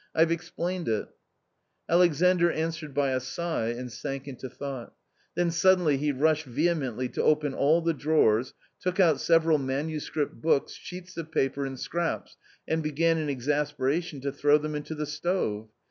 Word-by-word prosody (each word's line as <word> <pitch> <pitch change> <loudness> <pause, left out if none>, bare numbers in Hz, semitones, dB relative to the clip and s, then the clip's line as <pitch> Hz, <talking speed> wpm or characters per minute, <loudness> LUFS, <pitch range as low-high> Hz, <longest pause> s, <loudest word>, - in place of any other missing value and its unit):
" - - -44
Fve 165 +1 +4
explained 175 +1 -3
it! 110 -2 -1 0.4
" - - -49 0.3
Alexander 175 +1 +4
answered 160 -1 -3
by 140 0 +1
a 130 - +1
sigh, 130 -1 -2
and 120 +1 -4
sank 135 +4 -5
into 130 -1 -7
thought 135 -1 -7 0.4
Then 175 -1 +1
suddenly 175 -3 +4
he 145 +2 0
rushed 155 +3 +2
vehemently 130 -3 0
to - - -2
open 150 -2 +2
all 155 +6 +3
the 165 0 +1
drawers, 135 -6 +2 0.2
took 185 +1 -2
out 165 -7 +5
several 165 -2 +4
manuscript 145 0 -3
books, 155 -3 +2
sheets 180 0 -10
of 160 -1 -6
paper, 135 -1 0
and 135 -1 -7
scraps, 170 +3 -3 0.3
and 160 0 0
began 160 +2 +1
in 155 -2 -2
exasperation 145 +3 -1
to 140 +1 -2
throw 145 +1 +4
them 150 0 -4
into 150 +1 -4
the 150 0 -3
stove. 145 - -2
150 Hz, 165 wpm, -27 LUFS, 135-165 Hz, 0.4 s, out